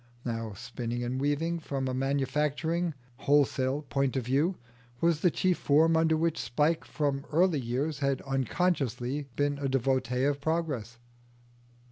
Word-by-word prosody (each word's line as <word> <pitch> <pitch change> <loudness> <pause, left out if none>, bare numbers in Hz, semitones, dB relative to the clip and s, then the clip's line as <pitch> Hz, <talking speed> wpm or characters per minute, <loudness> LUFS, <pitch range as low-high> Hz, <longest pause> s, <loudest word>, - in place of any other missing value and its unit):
Now 115 -3 -3
spinning 120 +1 -4
and 125 +2 -2
weaving 160 +4 0
from 135 -4 -3
a 130 - -1
manufacturing, 150 +5 0 0.2
wholesale 140 0 +2
point 135 -1 0
of 125 - -2
view, 145 +9 +1 0.4
was 165 0 +2
the 180 - +4
chief 180 +2 +1
form 160 +3 +4
under 160 0 +3
which 165 0 0
Spike 150 +8 +1
from 140 -2 -1
early 170 -1 +3
years 135 +5 -2
had 140 -2 +1
unconsciously 135 -1 -1
been 145 0 0
a 140 -1 -1
devotee 130 -1 +1
of 140 0 +1
Progress. 140 -8 -2
140 Hz, 140 wpm, -29 LUFS, 130-160 Hz, 0.4 s, the